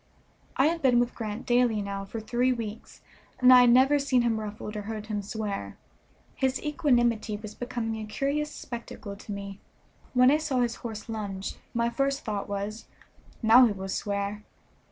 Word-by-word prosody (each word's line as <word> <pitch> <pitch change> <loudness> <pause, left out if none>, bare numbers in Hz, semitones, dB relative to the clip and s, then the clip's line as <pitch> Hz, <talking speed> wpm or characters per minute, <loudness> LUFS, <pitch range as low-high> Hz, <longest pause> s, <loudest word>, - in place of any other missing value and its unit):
I 265 - +4
had 330 +2 +1
been 250 -4 +4
with 240 0 0
Grant 215 -1 -5
daily 240 -3 +3
now 200 -1 -4
for 225 +3 -6
three 240 +4 +1
weeks, 225 -3 -6 0.4
and 255 0 +8
I 250 - +9
had 245 - +6
never 265 +4 +5
seen 270 -3 +2
him 225 -2 +1
ruffled 210 0 -6
or 210 - -3
heard 215 0 -5
him 210 -2 -3
swear. 200 - -5 0.6
His 265 0 0
equanimity 240 -8 +1
was 215 0 -9
becoming 235 -2 -3
a 215 - -6
curious 280 +7 -1
spectacle 235 -6 -8
to 205 - -10
me. 200 -1 -6 0.6
When 250 +1 +6
I 300 - +4
saw 295 -5 0
his 235 -1 0
horse 220 -3 -7
lunge 200 -4 -5 0.2
my 235 0 +1
first 275 +2 -1
thought 210 -2 -3
was, 205 +2 -4 0.6
"Now 240 +3 +8
he 215 - -1
will 190 -1 -6
swear." 200 +1 -2
225 Hz, 175 wpm, -27 LUFS, 210-250 Hz, 0.6 s, I